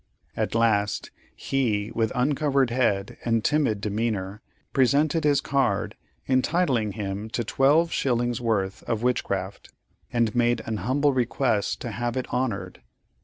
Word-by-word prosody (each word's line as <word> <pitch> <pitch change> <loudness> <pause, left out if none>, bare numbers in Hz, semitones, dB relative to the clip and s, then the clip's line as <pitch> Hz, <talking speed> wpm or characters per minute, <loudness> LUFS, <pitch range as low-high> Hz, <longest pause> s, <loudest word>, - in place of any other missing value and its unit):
At - - -2
last, 105 -3 +1 0.2
he 110 -6 -1
with 110 -2 0
uncovered 135 0 +1
head 105 -6 0
and 115 -2 0
timid 145 -9 +2
demeanor 105 -1 -2 0.3
presented 145 +4 +2
his 145 -1 +3
card 135 -3 0 0.3
entitling 130 - +1
him 100 +1 -4
to 120 - -2
twelve 145 +8 +3
shillings' 120 -2 0
worth 100 -5 -1
of 115 -1 -1
witchcraft, 100 -6 -2 0.4
and 115 -2 +1
made 120 -2 +1
an 110 -1 -2
humble 135 +8 +1
request 120 -3 0
to 120 - -4
have 120 +1 -3
it 130 - -1
honored. 125 -5 -2
120 Hz, 130 wpm, -25 LUFS, 105-135 Hz, 0.4 s, his